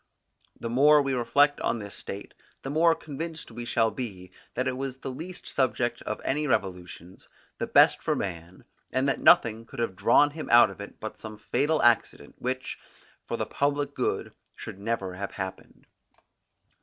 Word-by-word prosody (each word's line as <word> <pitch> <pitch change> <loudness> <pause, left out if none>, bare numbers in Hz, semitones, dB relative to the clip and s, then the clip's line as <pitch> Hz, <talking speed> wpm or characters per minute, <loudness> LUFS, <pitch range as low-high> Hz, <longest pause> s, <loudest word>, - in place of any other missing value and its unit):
The - - -4
more 145 +6 +6
we 135 -1 -1
reflect 145 +4 +3
on - - 0
this 100 -2 -8
state, 100 +1 -8 0.3
the 135 - -4
more 165 +2 +4
convinced 160 +2 -6
we 120 - -6
shall 115 -1 +2
be, 95 -8 -6 0.2
that 130 +1 0
it 130 - -1
was 135 0 -4
the 135 - -6
least 175 +7 -8
subject 120 -2 0
of 105 - -4
any 150 +3 0
to - - -3
revolutions, 90 -4 -3 0.3
the - - -2
best - - +5
for - - 0
man, 85 -1 -5 0.3
and 130 +2 +1
that 140 - +1
nothing 115 0 +5
could 115 - -13
have 115 -5 -1
drawn 145 +9 +4
him 155 +1 -7
out 120 -4 +7
of 95 - -10
it 100 - -10
but 110 - -7
some 110 -1 -8
fatal 145 +8 0
accident, 120 -1 +2
which, 130 +1 -3 0.5
for - - -2
the - - -1
public 145 0 -1
good, - - -2 0.2
should 95 - -8
never 100 -3 -2
have 100 +2 -5
happened. 95 -2 -7
120 Hz, 180 wpm, -27 LUFS, 100-140 Hz, 0.5 s, out